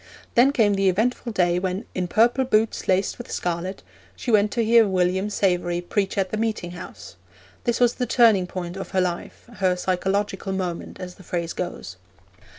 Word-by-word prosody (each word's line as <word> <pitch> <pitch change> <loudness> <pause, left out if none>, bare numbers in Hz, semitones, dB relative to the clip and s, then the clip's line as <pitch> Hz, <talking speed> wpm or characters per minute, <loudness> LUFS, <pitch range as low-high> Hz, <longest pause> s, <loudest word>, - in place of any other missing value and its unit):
Then 255 +4 +5
came 220 -7 +3
the 195 -1 +3
eventful 235 +5 0
day 180 -3 +2
when 190 +4 -3
'in 180 -1 -2
purple 235 +8 +3
boots 225 -3 +1
laced 190 +4 +1
with 240 - -8
scarlet' 180 +2 -3 0.3
she 245 - -3
went 210 -1 +4
to 230 -2 +1
hear 230 -1 +6
William 190 +1 +1
Savery 180 -4 0
preach 195 +3 -2
at 190 -1 0
the 215 - -1
Meeting 215 -6 -2
House. 180 +1 -10 0.5
This 240 -1 +1
was 245 -1 +4
the 250 - -3
turning 220 -7 +4
point 180 0 -5
of 195 - -6
her - - +5
life, 175 -1 -4
her 185 -2 +2
psychological 190 +1 -1
moment, 180 -3 -4
as 180 -1 -7
the - - -14
phrase 170 -1 -3
goes. 135 - -6
190 Hz, 180 wpm, -24 LUFS, 180-220 Hz, 0.5 s, hear